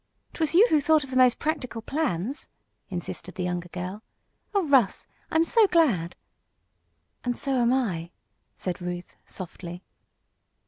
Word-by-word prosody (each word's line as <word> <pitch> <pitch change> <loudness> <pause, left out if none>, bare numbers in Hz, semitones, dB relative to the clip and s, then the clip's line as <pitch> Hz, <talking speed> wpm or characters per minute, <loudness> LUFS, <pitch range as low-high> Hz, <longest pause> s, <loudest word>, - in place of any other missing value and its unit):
"'Twas 320 0 0
you 405 +6 +8
who 305 - +5
thought 310 +1 +4
of 270 - -10
the - - -3
most 255 -1 +5
practical 295 -7 -2
plans!" 260 - -2 0.4
insisted 180 0 -6
the 185 - -2
younger 175 0 -3
girl. 185 +4 -5 0.5
"Oh, 395 -5 +1
Russ! 265 -8 +3 0.2
I'm 320 +1 +3
so 440 +5 +5
glad!" 245 - +2 1.1
"And 245 -1 -1
so 275 -2 0
am 240 0 +3
I," 190 -11 0 0.5
said 180 -1 -4
Ruth, 175 0 -5
softly. 180 -1 -7
240 Hz, 140 wpm, -26 LUFS, 180-300 Hz, 1.1 s, you